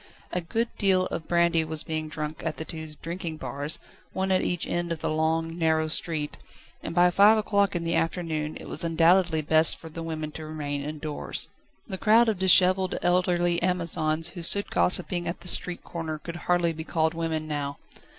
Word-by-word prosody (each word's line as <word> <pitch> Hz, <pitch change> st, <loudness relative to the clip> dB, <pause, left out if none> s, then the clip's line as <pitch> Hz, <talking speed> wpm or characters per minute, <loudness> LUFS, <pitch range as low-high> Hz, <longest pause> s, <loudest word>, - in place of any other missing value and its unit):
A 180 Hz, -, -1 dB
good 225 Hz, +7 st, -2 dB
deal 190 Hz, -3 st, +3 dB
of 160 Hz, -, -5 dB
brandy 170 Hz, -1 st, +2 dB
was 160 Hz, -1 st, -1 dB
being 155 Hz, -1 st, -4 dB
drunk 155 Hz, 0 st, -5 dB
at 160 Hz, -3 st, -3 dB
the 160 Hz, -, -5 dB
two 160 Hz, -1 st, -7 dB, 0.2 s
drinking 165 Hz, -1 st, -5 dB
bars, 140 Hz, +2 st, -1 dB, 0.4 s
one 190 Hz, 0 st, -1 dB
at 185 Hz, -, +3 dB
each 175 Hz, -1 st, -1 dB
end 175 Hz, 0 st, -3 dB
of 165 Hz, -, -2 dB
the -, -, -3 dB
long, 160 Hz, +2 st, -1 dB
narrow 160 Hz, -1 st, +1 dB
street, 155 Hz, -2 st, 0 dB, 0.4 s
and 165 Hz, -, -6 dB
by 175 Hz, 0 st, +5 dB
five 205 Hz, +4 st, +6 dB
o'clock 200 Hz, -2 st, +1 dB
in 170 Hz, -, -2 dB
the 165 Hz, 0 st, -1 dB
afternoon 160 Hz, -3 st, -2 dB
it -, -, -10 dB
was -, -, 0 dB
undoubtedly 165 Hz, 0 st, +3 dB
best 160 Hz, +1 st, +5 dB
for 160 Hz, -, -11 dB
women 155 Hz, -2 st, -5 dB
to 160 Hz, -, -8 dB
remain 145 Hz, -2 st, -4 dB
indoors. 150 Hz, +1 st, -3 dB, 0.4 s
The 190 Hz, -4 st, -4 dB
crowd 225 Hz, +2 st, +4 dB
of 210 Hz, -5 st, -2 dB
dishevelled 185 Hz, 0 st, +5 dB
elderly 175 Hz, -1 st, +1 dB
Amazons 165 Hz, -2 st, +1 dB
who 175 Hz, 0 st, -8 dB
stood 200 Hz, +5 st, +3 dB
gossiping 180 Hz, -1 st, +1 dB
at 170 Hz, -, -5 dB
the -, -, -10 dB
street 180 Hz, 0 st, +3 dB
corner 165 Hz, -2 st, -5 dB
could 170 Hz, +2 st, -8 dB
hardly 175 Hz, -1 st, +2 dB
be 160 Hz, 0 st, -6 dB
called 160 Hz, 0 st, 0 dB
women 160 Hz, -1 st, -3 dB
now. 145 Hz, -2 st, -4 dB
165 Hz, 190 wpm, -26 LUFS, 155-180 Hz, 0.4 s, five